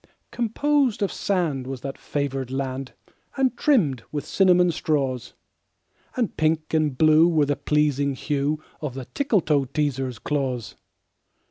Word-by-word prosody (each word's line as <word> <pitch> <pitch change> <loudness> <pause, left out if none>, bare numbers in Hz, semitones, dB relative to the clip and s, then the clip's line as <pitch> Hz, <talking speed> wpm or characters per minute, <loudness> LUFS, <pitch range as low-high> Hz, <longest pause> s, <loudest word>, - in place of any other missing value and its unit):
Composed 250 0 +1
of 200 - 0
sand 160 -10 -1
was 135 -2 -5
that 135 0 -5
favored 135 -3 -3
land, 135 0 -4 0.4
And 260 -2 +2
trimmed 185 - +2
with 145 -2 -3
cinnamon 180 -1 +4
straws; 135 -6 -1 0.8
And 240 -4 -1
pink 155 0 0
and 155 -4 +1
blue 155 +2 +6
was 155 -4 +2
the 145 - +2
pleasing 145 -1 +1
hue 145 +3 -1 0.2
Of 145 -5 -4
the 135 -2 -6
Tickletoeteaser's 145 - 0
claws. 130 -4 -2
150 Hz, 125 wpm, -24 LUFS, 135-175 Hz, 0.8 s, blue